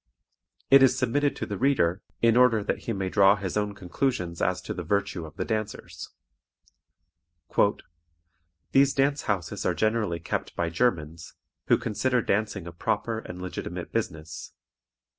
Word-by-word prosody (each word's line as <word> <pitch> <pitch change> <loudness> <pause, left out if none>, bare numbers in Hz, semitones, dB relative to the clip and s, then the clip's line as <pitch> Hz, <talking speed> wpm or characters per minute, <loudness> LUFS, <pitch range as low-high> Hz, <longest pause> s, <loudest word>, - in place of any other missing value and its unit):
It 135 0 +9
is 130 -1 +5
submitted 140 +3 +1
to - - -4
the 100 -2 -5
reader, 105 -9 +2 0.2
in 115 -1 +5
order 120 -4 +5
that - - -2
he - - -1
may 95 -3 -2
draw 100 +1 +5
his 95 -3 -4
own 105 -1 -1
conclusions 90 -3 -2
as - - +1
to - - -4
the - - -5
virtue 100 -5 -1
of 75 - -14
the - - -3
dancers. 110 -2 -4 2.6
"These 135 0 +4
dance 140 +1 +2
houses 95 -6 -2
are - - +1
generally 110 -6 0
kept 85 - -4
by 85 -1 -1
Germans, 85 -6 -1 0.3
who - - +5
consider 125 +2 0
dancing 100 -3 -1
a 85 - -7
proper 110 +6 -2
and 90 -5 -9
legitimate 90 0 -5
business. 80 0 -4
105 Hz, 150 wpm, -27 LUFS, 90-125 Hz, 2.6 s, It